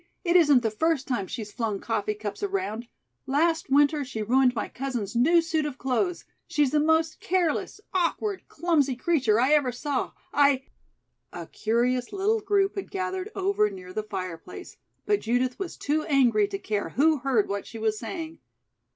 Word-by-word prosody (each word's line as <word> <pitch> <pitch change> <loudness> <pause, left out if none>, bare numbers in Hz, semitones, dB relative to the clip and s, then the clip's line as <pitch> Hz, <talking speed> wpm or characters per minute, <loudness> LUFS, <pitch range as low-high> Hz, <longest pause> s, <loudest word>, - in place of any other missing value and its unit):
It 345 -1 +1
isn't 295 -8 +6
the 225 - 0
first 295 +4 0
time 235 -8 -1
she's 215 0 -6
flung 220 -4 -2
coffee 210 -2 -2
cups 210 -1 -6
around. 375 - -2 0.4
Last 325 +4 +1
winter 290 +2 +4
she 225 -5 -4
ruined 250 +3 +3
my 225 - -2
cousin's 245 -6 -4
new 330 +8 +4
suit 320 -1 0
of 290 -3 -4
clothes. 340 +8 -1 0.2
She's 295 -6 +1
the 300 - +3
most 320 +1 +2
careless, 355 +1 -1
awkward, 380 +3 -1
clumsy 300 -5 +1
creature 250 -6 +2
I 260 +4 +3
ever 285 -4 +3
saw. 270 +2 -3 0.2
I 280 -2 +4 0.3
" - - -51
A - - -7
curious 245 - 0
little 410 +3 +1
group 400 -1 +1
had 390 - -4
gathered 375 +1 -3
over 385 - +1
near 185 -2 -10
the 215 - -1
fireplace, 185 -5 -7 0.3
but 415 -1 +2
Judith 245 +2 0
was 385 -4 -5
too 300 +2 0
angry 240 -8 +3
to 200 -1 -4
care 205 0 -3
who 310 +3 +3
heard 245 -5 +1
what 200 0 -4
she 225 - -9
was 220 -1 -1
saying. 325 -3 -6
275 Hz, 175 wpm, -26 LUFS, 225-335 Hz, 0.4 s, isn't